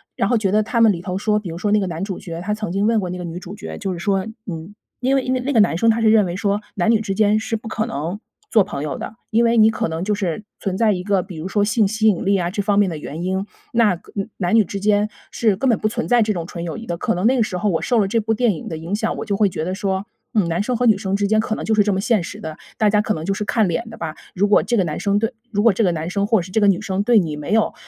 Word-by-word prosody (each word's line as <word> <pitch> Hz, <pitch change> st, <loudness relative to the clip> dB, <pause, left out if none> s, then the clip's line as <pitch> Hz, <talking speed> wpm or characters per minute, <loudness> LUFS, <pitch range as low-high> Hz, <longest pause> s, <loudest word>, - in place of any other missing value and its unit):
然 195 Hz, -, 0 dB
后 240 Hz, -, +3 dB
觉 195 Hz, -3 st, 0 dB
得 215 Hz, +1 st, +3 dB
他 230 Hz, +2 st, -1 dB
们 220 Hz, -3 st, +6 dB
里 170 Hz, -, -6 dB
头 180 Hz, +1 st, -3 dB
说， 210 Hz, +1 st, +1 dB
比 200 Hz, -5 st, -4 dB
如 165 Hz, -, -6 dB
说 205 Hz, +4 st, -1 dB
那 210 Hz, -, +4 dB
个 190 Hz, -, -1 dB
男 165 Hz, 0 st, -5 dB
主 195 Hz, -2 st, -3 dB
角， 165 Hz, -1 st, -7 dB
他 210 Hz, +3 st, -2 dB
曾 215 Hz, -5 st, -4 dB
经 200 Hz, +3 st, +1 dB
问 230 Hz, -, +3 dB
过 180 Hz, -, -3 dB
那 180 Hz, -, -4 dB
个 180 Hz, -, -5 dB
女 170 Hz, +1 st, -6 dB
主 185 Hz, +2 st, -9 dB
角， -, -, -7 dB
就 195 Hz, -, -3 dB
是 175 Hz, -, -5 dB
说 190 Hz, 0 st, 0 dB, 0.2 s
嗯， 170 Hz, +2 st, -7 dB, 0.3 s
因 270 Hz, +2 st, +2 dB
为 -, -, +2 dB
因 255 Hz, -, -1 dB
为 255 Hz, -, 0 dB
那 275 Hz, +3 st, -2 dB
个 230 Hz, -, +3 dB
男 205 Hz, -5 st, +3 dB
生 230 Hz, +5 st, +3 dB
他 225 Hz, +1 st, +3 dB
是 220 Hz, -1 st, +4 dB
认 215 Hz, -2 st, +5 dB
为 180 Hz, +1 st, -4 dB
说 200 Hz, 0 st, 0 dB
男 200 Hz, +3 st, +1 dB
女 220 Hz, -1 st, +3 dB
之 200 Hz, -3 st, -2 dB
间 210 Hz, +1 st, +3 dB
是 225 Hz, 0 st, -2 dB
不 225 Hz, -, -10 dB
可 220 Hz, 0 st, -1 dB
能 180 Hz, +1 st, -4 dB, 0.3 s
做 215 Hz, -4 st, +5 dB
朋 165 Hz, -8 st, -5 dB
友 150 Hz, -, -3 dB
的， -, -, -7 dB, 0.2 s
因 230 Hz, +2 st, +3 dB
为 230 Hz, 0 st, +3 dB
你 220 Hz, 0 st, +7 dB
可 220 Hz, -, -1 dB
能 160 Hz, +2 st, -3 dB
就 210 Hz, +1 st, 0 dB
是 195 Hz, -1 st, -2 dB, 0.2 s
存 190 Hz, -2 st, -2 dB
在 220 Hz, -1 st, +3 dB
一 180 Hz, -2 st, -2 dB
个 195 Hz, -3 st, +1 dB
比 180 Hz, -5 st, -10 dB
如 160 Hz, +4 st, -5 dB
说 205 Hz, +1 st, +1 dB
性 215 Hz, 0 st, +2 dB
吸 220 Hz, +2 st, +1 dB
引 190 Hz, -3 st, 0 dB
力 200 Hz, 0 st, +3 dB
啊 175 Hz, -2 st, -1 dB
这 205 Hz, -, -1 dB
方 200 Hz, 0 st, +1 dB
面 205 Hz, -2 st, +4 dB
的 160 Hz, -, -5 dB
原 155 Hz, +3 st, -6 dB
因， 190 Hz, +2 st, -1 dB, 0.3 s
那 220 Hz, -6 st, +4 dB
根 195 Hz, +5 st, -6 dB
男 180 Hz, +1 st, -1 dB
女 220 Hz, -, +6 dB
之 200 Hz, -, -5 dB
间 205 Hz, +1 st, +2 dB, 0.2 s
是 220 Hz, -4 st, +2 dB
根 250 Hz, +7 st, 0 dB
本 225 Hz, -, +2 dB
不 215 Hz, -, +1 dB
存 235 Hz, +2 st, -2 dB
在 245 Hz, -1 st, +4 dB
这 215 Hz, -1 st, +1 dB
种 170 Hz, -3 st, -4 dB
纯 170 Hz, -1 st, -7 dB
友 165 Hz, -, -4 dB
谊 230 Hz, -, -8 dB
的。 170 Hz, -1 st, -3 dB
可 -, -, 0 dB
能 180 Hz, +4 st, -1 dB
那 260 Hz, +2 st, +4 dB
个 235 Hz, -, +4 dB
时 185 Hz, -4 st, -3 dB
候 210 Hz, +2 st, 0 dB
我 165 Hz, -, 0 dB
受 245 Hz, -, +1 dB
了 200 Hz, -, +2 dB
这 230 Hz, +2 st, +2 dB
部 220 Hz, +1 st, 0 dB
电 225 Hz, -2 st, +2 dB
影 160 Hz, -, -8 dB
的 160 Hz, -, -4 dB
影 165 Hz, +4 st, -6 dB
响， -, -, -1 dB
我 -, -, -3 dB
就 200 Hz, -2 st, -1 dB
会 205 Hz, -1 st, +4 dB
觉 160 Hz, -4 st, -3 dB
得 185 Hz, +2 st, -2 dB
说， 190 Hz, 0 st, -2 dB, 0.3 s
嗯， 205 Hz, -6 st, +2 dB
男 170 Hz, +3 st, 0 dB
生 245 Hz, +4 st, -1 dB
和 245 Hz, +1 st, 0 dB
女 215 Hz, -4 st, +5 dB
生 195 Hz, 0 st, -2 dB
之 200 Hz, 0 st, +1 dB
间 220 Hz, -, +3 dB
可 220 Hz, 0 st, -1 dB
能 -, -, -5 dB
就 220 Hz, -, 0 dB
是 215 Hz, -, +4 dB
这 205 Hz, 0 st, +1 dB
么 190 Hz, -, 0 dB
现 220 Hz, -2 st, +2 dB
实 205 Hz, +5 st, -8 dB
的， 155 Hz, -3 st, -6 dB, 0.2 s
大 215 Hz, -, +3 dB
家 210 Hz, 0 st, +3 dB
可 215 Hz, -, -1 dB
能 155 Hz, -, -5 dB
就 195 Hz, -, 0 dB
是 210 Hz, +1 st, -3 dB
看 220 Hz, -2 st, +2 dB
脸 225 Hz, +7 st, -2 dB
的 225 Hz, -, -9 dB
吧。 160 Hz, -1 st, -5 dB, 0.2 s
如 200 Hz, +3 st, +2 dB
果 210 Hz, -, +5 dB
这 240 Hz, -, -1 dB
个 195 Hz, -, +3 dB
男 155 Hz, -3 st, -3 dB
生 200 Hz, 0 st, +1 dB
对 225 Hz, +4 st, 0 dB, 0.2 s
如 205 Hz, -2 st, 0 dB
果 230 Hz, -, +6 dB
这 210 Hz, +4 st, 0 dB
个 175 Hz, -, +3 dB
男 160 Hz, +1 st, -3 dB
生 200 Hz, +2 st, -1 dB
或 220 Hz, -1 st, +3 dB
者 -, -, -1 dB
是 185 Hz, -, -11 dB
这 220 Hz, -, +2 dB
个 205 Hz, -, +4 dB
女 195 Hz, -3 st, +3 dB
生 190 Hz, 0 st, -1 dB
对 230 Hz, -1 st, +5 dB
你 155 Hz, -4 st, -2 dB
没 150 Hz, +7 st, -3 dB
有 220 Hz, -1 st, +2 dB
205 Hz, 370 characters per minute, -20 LUFS, 180-220 Hz, 0.3 s, 你